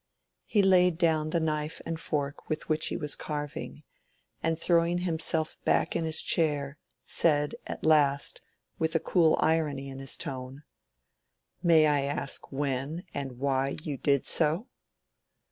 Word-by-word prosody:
He 205 -3 +2
laid 180 -3 +4
down 160 -3 +1
the 170 - 0
knife 155 -1 -2
and 165 -1 -4
fork 145 -3 -4
with 155 - -3
which 155 0 +1
he - - -2
was 150 -1 -1
carving, 150 -1 -6 0.6
and 165 0 0
throwing 170 +1 +2
himself 165 -2 0
back - - +1
in 165 -1 0
his 160 0 +1
chair, 145 -3 0 0.3
said 150 -3 +3
at - - -6
last, 145 -3 +3 0.4
with 160 +1 0
a - - +4
cool 160 -1 +3
irony 150 -4 0
in 135 0 -8
his 135 -1 0
tone— 130 +2 -6 1.0
"May 165 -3 +5
I 145 -2 +2
ask 140 0 -2
when 140 +4 -3
and 135 -3 -5
why 135 0 0
you 150 -3 -3
did 140 0 +1
so?" 165 +7 +2
155 Hz, 145 wpm, -28 LUFS, 140-165 Hz, 1.0 s, May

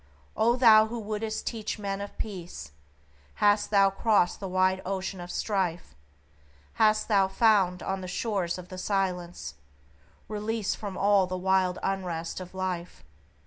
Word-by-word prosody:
O 235 +2 +3
thou 220 -3 +7
who 235 +2 -5
wouldst 215 0 -4
teach 225 -2 -3
men 200 -1 -3
of 200 - -8
Peace! 175 - -6 0.6
Hast 205 0 +3
thou 195 -2 +4
crossed 200 -3 +2
the 195 - -5
wide 185 0 +1
ocean 190 0 -4
of 175 - -8
strife? 180 - -2 0.9
Hast 215 0 +4
thou 195 -3 +3
found 195 -3 +2
on 190 0 -2
the 185 - -6
Shores 185 -3 -2
of 180 0 -10
the 185 - -7
Silence, 180 - -2 0.7
Release 215 0 -2
from 200 -3 -6
all 200 -2 +3
the 185 0 -3
wild 185 0 +1
unrest 180 -4 -3
of 185 0 -10
life? 180 - -4
195 Hz, 145 wpm, -28 LUFS, 185-210 Hz, 0.9 s, thou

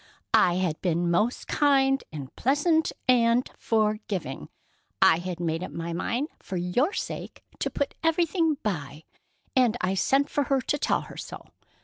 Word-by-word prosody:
"I 175 -1 +5
had 180 -4 -1
been 170 -1 +1
most 210 +8 0
kind 270 -2 +3
and 140 -4 -8
patient 315 +5 +2 0.2
and 240 0 +4
forgiving. 210 - -1 0.5
I 160 - +5
had 180 -1 -5
made 165 0 -1
up - - -5
my 170 0 -5
mind 245 - -2
for 185 - -5
your 180 - +1
sake - - -6 0.2
to - - 0
put 285 - -2
everything 325 -1 +2
by, 155 -7 -4 0.5
and 245 -3 +3
I 185 +1 0
sent 270 +8 +2
for 290 -1 -1
her 275 0 +2
to 290 +4 -1
tell - - +1
her - - -11
so. - - -8
220 Hz, 155 wpm, -26 LUFS, 175-275 Hz, 0.5 s, I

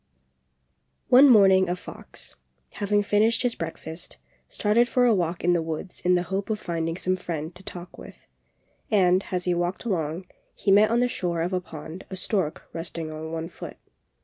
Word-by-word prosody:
One 265 +3 +8
morning 190 -5 +6
a 175 - 0
fox, 180 - -9 0.4
having 205 0 0
finished 215 +4 +2
his 245 -1 +1
breakfast, 160 -4 -7 0.3
started 225 +3 +2
for 245 +1 +2
a 240 - +5
walk 175 -3 -1
in 175 +1 +4
the 170 - +2
woods 160 +3 -5
in 180 0 +3
the 175 - +1
hope 195 +3 -3
of 215 -1 -1
finding 165 -1 -3
some 185 0 0
friend 165 -3 -5
to 180 - -12
talk 180 -1 -9
with; - - -13 0.6
and, 185 -3 +4
as 180 -1 -1
he 180 - +2
walked 175 +5 -2
along, 170 -4 -2 0.3
he 195 - 0
met 210 +2 +6
on 235 +1 +2
the 245 - +3
shore 175 -8 -2
of 180 +2 -2
a 180 - 0
pond 160 +2 -9
a 190 - -5
stork 185 -4 -2
resting 165 -1 -5
on 160 +1 -6
one 165 0 -3
foot. - - -9
180 Hz, 185 wpm, -25 LUFS, 165-205 Hz, 0.6 s, One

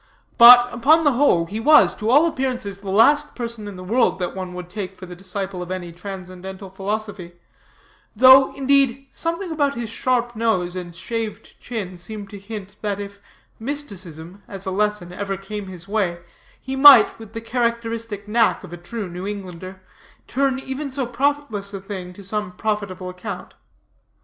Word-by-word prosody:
But, 240 +1 +10
upon 300 +7 +4
the 290 - +4
whole, 245 -10 +3
he 205 +6 -5
was, 300 +6 +6
to 215 0 -3
all 290 +6 +6
appearances, 255 -10 -2
the 200 -1 -8
last 285 +9 +4
person 235 -3 -5
in 205 - -8
the 185 - -9
world 230 +5 +2
that 180 0 -4
one 185 -1 -6
would 180 -1 -7
take 190 0 -6
for 185 - -9
the 180 0 -10
disciple 190 0 -5
of 180 - -7
any 185 -2 -5
transcendental 185 +1 -9
philosophy; 200 -2 -4 0.8
though, 260 +1 +8
indeed, 275 -1 +2
something 335 +2 -2
about 285 -3 0
his 235 -2 -5
sharp 240 0 0
nose 185 -6 0
and 175 -2 -7
shaved 225 +4 -5
chin 195 -7 -5
seemed 205 +2 -7
to 205 - -8
hint 200 -1 -9
that 205 -2 -2
if 200 0 -8 0.4
mysticism, 200 - -6
as 195 0 -6
a 190 - -2
lesson, 210 -3 -1
ever 195 +1 -3
came 205 +1 -6
in - - -10
his 180 -1 -9
way, 195 -5 -1 0.4
he 265 +1 -5
might, 275 -2 +8
with 220 -1 -12
the 225 - -4
characteristic 230 -3 -2
knack 225 0 +2
of 180 -2 -10
a - - -6
true 195 +4 -6
New 180 +2 -6
Englander, 185 -2 -7 0.4
turn 270 0 0
even 265 +2 -5
so 265 -1 -2
profitless 240 -5 -2
a - - -4
thing 190 -2 -7
to 200 +2 -13
some 205 -1 -3
profitable 200 -2 -3
account. 180 0 -7
210 Hz, 175 wpm, -22 LUFS, 185-240 Hz, 0.8 s, But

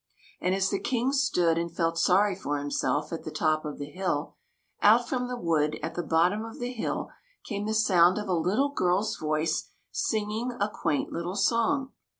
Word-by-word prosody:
And 185 +1 +1
as 195 0 +1
the 200 - 0
King 250 +1 0
stood 180 -12 +2
and 170 0 -3
felt 165 0 0
sorry 190 +4 +3
for 145 -6 -2
him 145 0 -4
self 150 +3 -1
at 165 - -5
the - - -5
top 155 0 0
of 150 - -5
the 145 - -5
hill, 155 -1 -2 0.5
out 230 +3 +5
from 250 -1 -1
the 250 0 -4
wood 155 -6 +1
at - - -3
the 175 - -2
bottom 175 +6 +2
of 225 0 -8
the 245 0 -3
hill 230 - -3 0.3
came 205 -1 -3
the 220 - 0
sound 185 -4 +5
of 210 -1 -3
a 185 - 0
little 195 - +1
girl's 195 -4 +1
voice, 155 +1 -1 0.2
singing 220 +3 -1
a 205 - +1
quaint 150 -7 -2
little 175 +2 -3
song. 230 +6 +1
185 Hz, 195 wpm, -28 LUFS, 165-220 Hz, 0.5 s, out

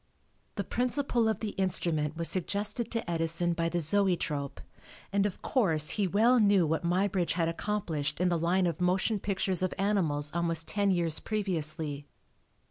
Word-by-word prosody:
The 200 - -2
principle 245 +1 +1
of 220 - -2
the 215 -2 -3
instrument 165 -4 0
was 165 -1 -1
suggested 205 +5 -2
to 230 -4 -3
Edison 170 +1 +1
by 165 0 -1
the 175 - -1
zoetrope, 165 -5 0 0.5
and 200 0 +2
of 195 - -9
course, 160 - +2
he 205 -2 0
well 230 +7 +4
knew 200 -4 +4
what 160 +2 -1
Muybridge 180 +1 0
had 165 -2 0
accomplished 165 -5 -3
in 180 0 +2
the 170 -1 0
line 180 +3 +1
of 170 +1 -2
motion 190 +4 +1
pictures 190 -2 -1
of 185 - -1
animals 165 -8 0
almost 165 -1 -1
ten 205 -1 0
years 170 -4 +1
previously. 155 -8 -2
180 Hz, 160 wpm, -29 LUFS, 165-205 Hz, 0.5 s, well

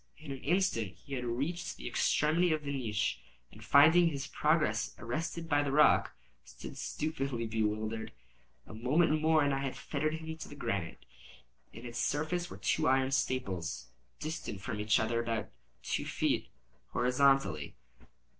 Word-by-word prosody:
In 155 -2 -9
an 135 - -5
instant 145 - +1
he 140 - -11
had 125 -2 -2
reached 140 +9 -3
the 60 - -7
extremity 160 - +2
of 155 -1 0
the 140 -1 -3
niche, 110 -5 -1 0.3
and - - -13
finding 160 +5 +6
his 140 -4 -2
progress 145 -11 +1
arrested 165 +8 -4
by 145 -2 +3
the 145 -1 -1
rock, 150 +2 +5 0.3
stood - - -10
stupidly 140 -6 -3
bewildered. 110 0 -2 0.5
A - - -11
moment 155 +8 +2
more 160 -1 +4
and 145 -1 +2
I 135 - 0
had 135 -1 -3
fettered 155 +1 -2
him 160 0 -6
to - - -8
the 145 - -10
granite. 90 - -3 0.7
In 115 - -11
its 120 -1 -5
surface 165 +4 -1
were - - -9
two 155 - +1
iron 130 0 +3
staples, 90 - -2 0.3
distant 155 -9 -5
from 105 +2 -4
each 105 0 +3
other 115 +1 0
about 115 -2 -2 0.3
two - - -2
feet, - - 0 0.5
horizontally. 125 - +2
135 Hz, 155 wpm, -32 LUFS, 110-155 Hz, 0.7 s, finding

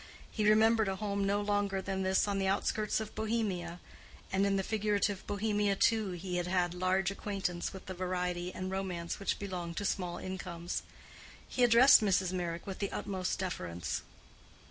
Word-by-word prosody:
He 210 -1 +2
remembered 220 0 +5
a 195 - 0
home 200 -1 -1
no 200 +1 +2
longer 205 -1 0
than 190 0 -2
this 190 +2 +2
on 200 -1 0
the 195 - +1
outskirts 210 +2 +1
of 220 -1 -6
Bohemia; 205 -6 -2 0.5
and 195 +1 +3
in 200 - +2
the 195 - +1
figurative 205 -2 0
Bohemia 205 -1 +1
too 215 -2 +2
he 180 +1 -3
had 175 0 -1
had 180 -1 +1
large 185 +1 +1
acquaintance 195 -4 -3
with 190 - -10
the 190 - -5
variety 180 -1 -2
and 185 0 -4
romance 185 -3 -3
which 200 - -1
belong 180 -4 -5
to 205 - -3
small 180 -3 -1
incomes. 175 -2 -4 0.7
He 250 - 0
addressed 240 +2 +8
Mrs. 190 -3 +2
Meyrick 170 -2 -3
with 195 -2 -6
the 200 - -2
utmost 185 -2 -2
deference. 90 - -3
195 Hz, 170 wpm, -32 LUFS, 180-205 Hz, 0.7 s, addressed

